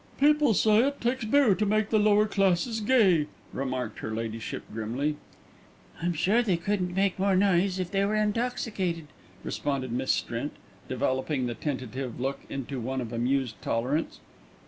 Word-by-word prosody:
"People 295 -4 +4
say 215 +1 +4
it 285 0 -3
takes 240 0 -1
beer 255 -1 +4
to 205 - 0
make 215 0 +1
the 215 - +4
lower 210 0 +4
classes 195 +2 +1
gay," 205 - +4 0.3
remarked 130 -4 -3
her - - -5
ladyship 115 0 -4
grimly. 120 +7 -2 0.9
"I'm 175 +1 0
sure 200 +9 +3
they 195 -8 +1
couldn't 180 0 -1
make 195 -1 +1
more 195 0 +3
noise 190 -1 +3
if 185 -1 -3
they 195 0 +2
were 205 +2 +1
intoxicated," 210 -7 -1 0.3
responded 135 -4 -2
Miss 130 +2 -2
Strint, - - -2 0.4
developing 130 0 0
the 120 - -2
tentative 130 -2 -4
look 135 +2 -2
into 135 0 -4
one 130 +3 -2
of 120 -2 -5
amused 125 0 -1
tolerance. 130 +8 -1
175 Hz, 155 wpm, -28 LUFS, 130-210 Hz, 0.9 s, People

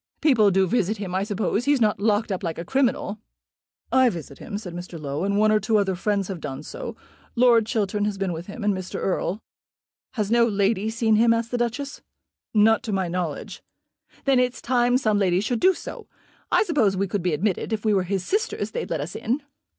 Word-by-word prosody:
"People 245 -9 +4
do 190 0 +3
visit 215 +1 0
him, 195 -3 -5
I 190 - +1
suppose. 210 +2 -1
He's 285 -1 +3
not 210 -4 +2
locked 210 +1 +1
up 190 - -2
like 170 -4 -3
a 170 - -5
criminal." 245 -4 0 0.7
"I 260 -1 +5
visit 160 - -8
him," 200 - -5
said 185 -5 -7
Mr. 175 -1 -7
Low, 145 +2 -3
"and 200 +1 0
one 215 +1 +4
or 215 - +4
two 220 0 +1
other 195 -2 +1
friends 200 +1 -1
have 185 -5 -6
done 135 -2 -6
so. - - -7 0.4
Lord 235 -3 +5
Chiltern 210 -3 0
has 205 -1 -2
been 195 -2 -1
with 165 +2 -7
him, 210 +2 -7
and 205 0 +2
Mr. 185 -1 -6
Erle." 195 +2 -1 0.7
"Has 215 -4 -2
no 235 0 +5
lady 205 0 +1
seen 225 -1 +2
him?" 230 +1 +5
asked 230 0 -3
the 245 - 0
Duchess. 260 +4 -3 0.5
"Not 220 +1 +4
to 235 -4 -5
my 190 -3 0
knowledge." 170 -4 -4 0.6
"Then 270 -2 +4
it's 250 0 0
time 245 0 +2
some 215 -5 +1
lady 185 -2 +2
should 225 +4 -1
do 375 0 +4
so. - - -8 0.4
I - - +4
suppose 255 - +1
we 195 +1 0
could 200 +1 -2
be 175 -1 0
admitted. 190 +7 -1
If 220 0 -2
we 215 - +3
were 195 - +3
his 190 0 -2
sisters 435 +4 -1
they'd 485 - -4
let - - -1
us - - -6
in." 255 +6 -2
210 Hz, 220 wpm, -24 LUFS, 190-235 Hz, 0.7 s, I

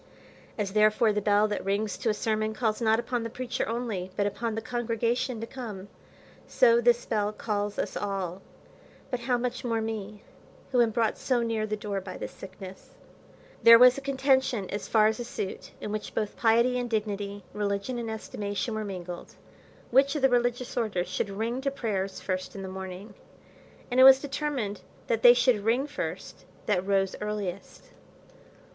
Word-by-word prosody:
As 200 -3 -2
therefore 215 +1 +4
the 210 - 0
bell 205 +1 +3
that 210 - -3
rings 200 +2 -1
to 230 - 0
a - - +3
sermon 215 0 -1
calls 220 -1 -1
not 220 -1 +3
upon 240 0 -2
the 230 - -4
preacher 250 +2 -3
only, 225 -6 -3
but 200 - +1
upon 225 +2 -2
the - - -1
congregation 240 +1 -1
to 225 - -4
come, 215 -6 -8 0.6
so 235 -1 +4
this 240 0 +3
bell 210 -2 0
calls 205 -1 -3
us - - -2
all; 195 -2 -3 0.7
but 250 - -1
how 245 +1 0
much 250 +1 -3
more 230 -2 0
me, 215 -2 -5 0.5
who 250 -2 +4
am 235 - +4
brought 225 0 0
so 245 -3 +1
near 225 -2 -1
the 215 - -1
door 200 -2 -3
by 185 -1 -8
this - - -6
sickness. 190 0 -11 0.7
There 230 0 +10
was 250 +1 +8
a 275 - -6
contention 265 -6 +1
as 205 0 -4
far 215 -2 +4
as 220 +2 +1
a - - -2
suit 205 -5 -5
(in 210 - -5
which 215 0 -5
both 210 -2 -2
piety 235 +2 +3
and 245 -1 -3
dignity, 205 -2 -3
religion 205 +4 -2
and 230 -1 -4
estimation, 210 0 -4
were 220 0 -2
mingled), 180 -3 -7 0.6
which 275 +4 +4
of 295 - -2
the 270 - +6
religious 245 0 0
orders 205 -7 -1
should 205 - -2
ring 225 +6 -2
to 275 - 0
prayers 200 -8 -3
first 185 0 -4
in 195 - -6
the - - -5
morning; 190 +2 -7 0.8
and 250 - +2
it - - +9
was 265 0 +10
determined, 270 -8 -3 0.2
that 225 -1 0
they 240 0 +9
should 245 -4 +3
ring 240 +5 +2
first 295 0 -6 0.2
that 190 -2 0
rose 195 -1 +1
earliest. 205 -3 -5
220 Hz, 180 wpm, -28 LUFS, 205-240 Hz, 0.8 s, There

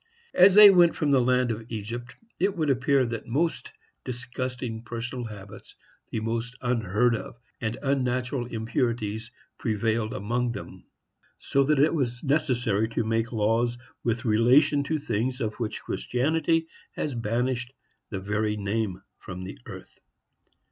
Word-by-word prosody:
As 185 +1 +7
they 210 -1 +11
went 175 -3 +5
from 150 -3 0
the 135 -2 +5
land 125 0 +2
of 115 +1 -6
Egypt, 115 +3 -5 0.2
it 195 +1 +1
would 155 -3 +2
appear 135 +1 +2
that 115 -2 -4
the - - -14
most 160 +7 -1 0.3
disgusting 125 -1 -4
personal 120 +1 -5
habits, 100 -3 -10 0.3
the - - -2
most 115 +2 -3
unheard 115 -1 +1
of 110 - -7 0.2
and 110 0 -2
unnatural 130 -2 0
impurities, 110 -1 -2 0.3
prevailed 110 -1 0
among 120 +4 -1
them; - - -9 0.5
so 140 - +1
that 150 +1 +3
it 145 +4 +4
was 125 -6 -2
necessary 125 -8 +1
to 115 - -1
make 115 +1 0
laws 115 +2 +1 0.3
with 115 +2 -1
relation 125 +6 +4
to 155 +2 0
things 125 -2 -2
of 110 -3 -1
which 115 -3 -3
Christianity 160 +5 0 0.3
has 145 - -3
banished 120 +2 -1 0.4
the 95 - -4
very 105 +2 -1
name 100 -1 -2 0.2
from 90 0 -7
the 95 - -8
earth. - - -11
120 Hz, 145 wpm, -26 LUFS, 110-130 Hz, 0.5 s, they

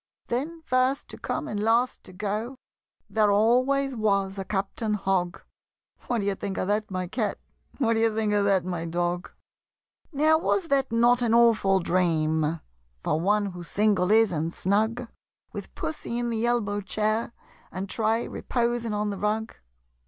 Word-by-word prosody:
Then, 315 +7 -3
first 255 +2 +1
to - - -9
come - - -3
and 210 - -3
last 230 +4 +1
to - - -11
go, 210 +6 -3 0.5
There 215 -2 +2
always 255 +6 +3
was 200 -3 0
a - - -2
Captain 210 +3 -2
Hogg 190 -3 -1 0.6
What 240 -3 0
d'ye 200 0 0
think 195 -1 -5
of - - -1
that, 210 +1 0
my 185 -1 -2
Cat? 210 +3 -2 0.4
What 230 -5 +2
d'ye 225 0 +3
think 215 -1 0
of 205 -1 +3
that, 195 -3 +2
my 175 -2 -3
Dog? 175 +1 -2 0.8
Now 310 +2 +3
was 340 -1 0
not 275 -1 +2
that 240 +2 +3
an 225 - +3
awful 220 -5 +4
dream 160 -3 +1 0.4
For 155 - 0
one 205 +2 +1
who 180 0 -8
single 195 +1 +1
is 220 -1 +5
and 165 0 -1
snug 220 +7 0 0.5
With - - -8
Pussy 270 -6 -4
in 240 0 -1
the 225 +1 0
elbow 205 -4 0
chair 215 +3 -1 0.4
And 190 +1 -4
Tray 225 +3 0
reposing 235 -2 -1
on 210 0 -1
the 200 - -5
rug? 215 +2 -1
215 Hz, 160 wpm, -26 LUFS, 195-235 Hz, 0.8 s, is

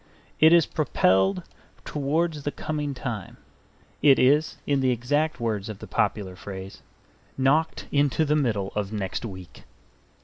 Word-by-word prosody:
It 160 +1 +7
is 170 -2 +6
propelled 95 - +1 0.4
towards 150 +2 -1
the 145 - -2
coming 145 -1 -4
time; 120 -6 -6 0.6
it 140 -2 +6
is, 145 +4 +3
in 140 -1 +1
the 130 -1 +2
exact 145 +6 0
words 110 -3 -2
of 105 - -6
the - - -9
popular 95 -3 -1
phrase, 95 0 -9 0.6
knocked 145 +5 +1
into 145 +2 +2
the 150 0 +2
middle 110 -10 0
of 105 -1 -2
next 105 +1 -3
week. 95 -5 -10
130 Hz, 140 wpm, -25 LUFS, 100-150 Hz, 0.6 s, It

